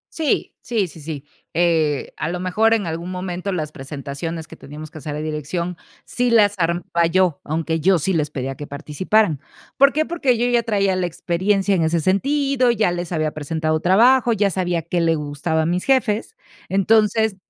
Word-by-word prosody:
Sí, 315 -4 -1
sí, 225 -5 0
sí, 160 0 -13
sí, 150 -2 -6 0.3
eh, 160 -4 +1
a - - -2
lo 180 +1 -3
mejor 215 +5 +2
en 210 -4 -2
algún 165 +2 -4
momento 185 +1 -4
las 155 -5 -3
presentaciones 145 +4 -6
que - - -11
teníamos 150 +2 -10
que 155 - -9
hacer 150 -1 -5
a - - -4
dirección, 155 +3 -3 0.3
sí 245 0 0
las 210 -3 +5
armaba 170 0 +1
yo, 180 -2 +1
aunque 160 +1 -2
yo 185 +3 +4
sí 190 +4 -1
les 150 -3 0
pedía 135 -2 -4
que 145 +2 -8
participaran, 155 +4 0 0.4
¿por 280 +1 +6
qué? 310 +2 0
Porque, 280 -8 +1
yo 240 - +1
ya 240 -1 +3
traía 200 -4 +1
la 185 -1 0
experiencia 190 +4 0
en 180 - +2
ese 165 +1 +1
sentido, 265 - +1
ya 220 -6 +2
les 175 0 -4
había 155 -2 0
presentado 155 +1 -1
trabajo, 235 +8 +4
ya 205 -2 +1
sabía 175 -3 -1
qué 170 +1 -1
le 165 -1 +2
gustaba 150 +2 -1
a - - -1
mis 175 +2 0
jefes. 255 - +1 0.3
Entonces, 215 +2 +3
175 Hz, 190 wpm, -21 LUFS, 155-210 Hz, 0.4 s, por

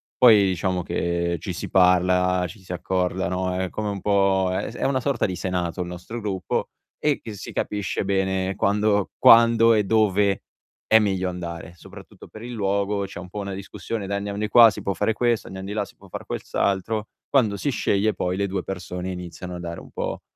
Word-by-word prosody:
Poi 110 -5 +7
diciamo 90 0 -1
che 85 -1 -1
ci - - -5
si - - -5
parla, 90 0 +3
ci 100 +5 -12
si 90 - -11
accorda, 90 +1 -1
no, 90 0 -1
è 95 0 -2
come 105 -1 -3
un 100 -1 -4
po' 95 -2 +2
è - - -2
s 115 - -11
è - - -4
una 135 -1 +1
sorta 140 -3 0
di 95 -3 -2
senato 90 -1 -2
il 90 - -3
nostro 90 +7 -7
gruppo 95 -3 -2 0.3
e 150 -2 +1
e 110 - -7
si 100 - -8
capisce 105 -1 -2
bene 95 -1 0
quando 105 0 +1
quando 115 0 +7
e 105 - +3
dove 100 -2 +2 0.5
è 110 - +6
meglio 95 -3 0
andare, 85 -1 -6
soprattutto 95 +2 -13
per 110 - -12
il 120 - -6
luogo 100 -1 0
c'è 95 - -9
un 90 0 -9
po' 105 - -6
una 100 -1 -4
discussione: 100 +2 -5
"Dai 100 +1 -1
andiamo 100 0 -4
di 105 - -1
qua 120 -2 +8
si 110 - -7
può 100 - -1
fare 105 +5 0
questo, 120 0 0
andiam 95 0 -7
di 100 - -5
là 105 -1 0
si - - -18
può 100 - -17
fare - - -7
quel - - -4
s - - -22
altro." 105 +2 0 0.2
Quando 110 -7 +2
si 140 +7 -1
sceglie 105 -1 +1
poi 90 +1 -2
le 100 - 0
2 95 -1 -2
persone 90 -1 -5
iniziano 90 0 -7
a - - -6
dare 85 -1 -6
un - - -13
po' - - -4
95 Hz, 220 wpm, -24 LUFS, 90-105 Hz, 0.5 s, qua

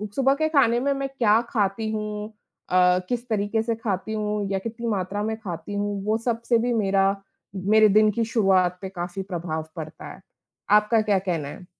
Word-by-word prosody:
सुबह 270 0 +3
के 315 +2 0
खाने 245 -6 +3
में 280 +2 0
मैं 275 0 -3
क्या 230 -5 +3
खाती 215 -1 0
हूँ 210 -1 -4 0.4
अ, 180 0 +4
किस 245 0 -2
तरीके 215 +1 0
से 230 0 -1
खाती 220 -2 -3
हूँ, 210 -1 -2
या 195 - 0
कितनी 230 +3 -5
मात्रा 205 0 -2
में 220 0 -1
खाती 180 -2 -7
हूँ, 205 -1 -2
वो 215 +1 +1
सबसे 235 0 +1
भी 240 +1 0
मेरा 195 -3 +2 0.5
मेरे 215 +3 +4
दिन 215 +1 +5
की 230 +2 -1
शुरुआत 190 -5 +2
पे 190 - -5
काफ़ी 180 +1 -5
प्रभाव 165 -4 -4
पड़ता 155 -2 -8
है। - - -15 0.5
आपका 210 +2 +4
क्या 205 -3 +2
कहना 170 -6 -2
है? 175 - -9
210 Hz, 190 wpm, -24 LUFS, 190-225 Hz, 0.5 s, दिन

